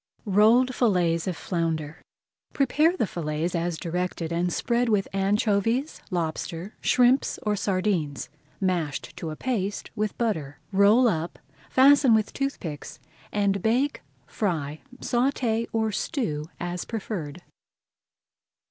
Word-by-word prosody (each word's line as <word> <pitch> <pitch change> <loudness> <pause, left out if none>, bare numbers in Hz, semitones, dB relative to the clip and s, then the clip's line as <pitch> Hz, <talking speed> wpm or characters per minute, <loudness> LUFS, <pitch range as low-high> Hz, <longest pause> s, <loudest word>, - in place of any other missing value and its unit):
ROLLED 225 +6 +4
FILLETS 180 -9 +2
OF 180 - -2
FLOUNDER 160 -3 -2 0.5
Prepare 305 +6 +2
the - - +2
fillets 160 -1 -3
as 170 -1 -1
directed 170 -1 -3
and 175 +1 0
spread 240 +4 0
with 205 -3 +2
anchovies, 210 +7 +1
lobster, 170 +1 -3
shrimps, 255 +2 +3
or 210 -1 +1
sardines, 185 -7 -1 0.3
mashed 170 -7 -2
to 170 -2 -5
a 155 - -5
paste 205 -2 -3
with 210 -1 -2
butter. 160 - -2
Roll 205 +6 +5
up, 170 -5 -1 0.3
fasten 270 -2 +6
with 215 -2 0
toothpicks, 185 - -4 0.3
and 200 -2 +1
bake, 250 +7 +1 0.2
fry, 155 -5 -2 0.2
sauté, 240 -3 0
or 220 -1 0
stew, 210 - -2
as 175 0 -3
preferred. 180 -8 -5
195 Hz, 115 wpm, -26 LUFS, 170-230 Hz, 0.5 s, fasten